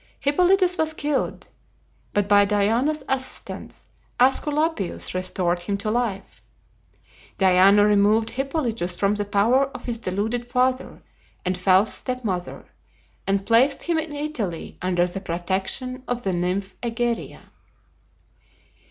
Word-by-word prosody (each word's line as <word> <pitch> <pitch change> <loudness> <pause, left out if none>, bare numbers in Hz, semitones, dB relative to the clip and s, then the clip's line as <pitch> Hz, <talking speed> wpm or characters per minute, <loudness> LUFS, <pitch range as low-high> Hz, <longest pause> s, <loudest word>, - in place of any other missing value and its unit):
Hippolytus 360 +5 +3
was 315 0 +1
killed, 295 -2 -2 0.6
but 205 -1 0
by 205 0 +6
Diana's 225 +9 +1
assistance 265 -1 -5 0.3
Aesculapius 290 - +1
restored 185 -1 0
him 200 +3 -3
to 215 +2 -2
life. 220 -5 -3 1.0
Diana 195 +2 +5
removed 210 +2 +3
Hippolytus 250 - -2
from 200 +2 +1
the 205 0 -2
power 225 +7 +3
of 275 - -11
his 235 -2 -3
deluded 225 +5 -2
father 255 +1 0 0.4
and 185 0 0
false 185 +3 +3
stepmother, 225 -9 -4 0.6
and 195 0 0
placed 255 +5 +3
him 335 -2 0
in 320 -1 -4
Italy 285 - -4
under 175 -1 +1
the 180 +2 -5
protection 190 +10 -3
of 245 0 -3
the 190 - -1
nymph 180 +3 -2
Egeria. 235 0 -3
220 Hz, 115 wpm, -23 LUFS, 195-260 Hz, 1.0 s, by